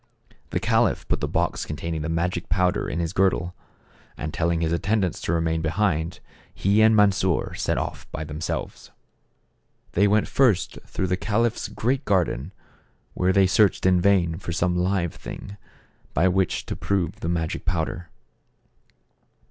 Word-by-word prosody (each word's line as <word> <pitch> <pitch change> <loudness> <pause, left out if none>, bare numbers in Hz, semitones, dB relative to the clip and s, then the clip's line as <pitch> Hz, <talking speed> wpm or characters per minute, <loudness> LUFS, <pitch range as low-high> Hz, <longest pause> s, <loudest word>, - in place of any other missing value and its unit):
The - - -1
caliph - - +1
put - - 0
the - - 0
box - - -1
contain 80 +2 -4
ing 80 - -3
the 80 - -3
magic 85 +1 -1
powder 90 +3 +1
in - - -3
his 85 +1 -2
girdle, 90 -2 +1 0.6
and 75 +1 -4
telling 85 0 0
his 80 -1 0
attendants 95 +2 0
to - - -2
remain 80 -1 0
behind, 85 0 -1 0.3
he 100 +3 +2
and 110 0 +6
Mansor 100 -4 +2
set - - -1
off - - -5
by 80 - -4
themselves. 75 +1 -5 1.0
They 100 +3 +3
went 105 +1 +2
first 115 -9 +2
through 95 - -2
the 90 0 0
caliph's 115 +3 0
great 130 +5 -1
garden, 90 - 0 0.6
where 90 +1 +1
they 95 0 +4
searched 95 0 +3
in 90 -1 +4
vain 85 -4 +2
for - - -5
some 90 +1 0
live 90 -1 0
thing, 100 - -8 0.6
by 85 +6 +4
which 95 0 0
to - - -4
prove 95 -4 -1
the 80 - -3
magic 80 -2 -2
powder. 85 +1 -2
90 Hz, 155 wpm, -24 LUFS, 85-100 Hz, 1.0 s, and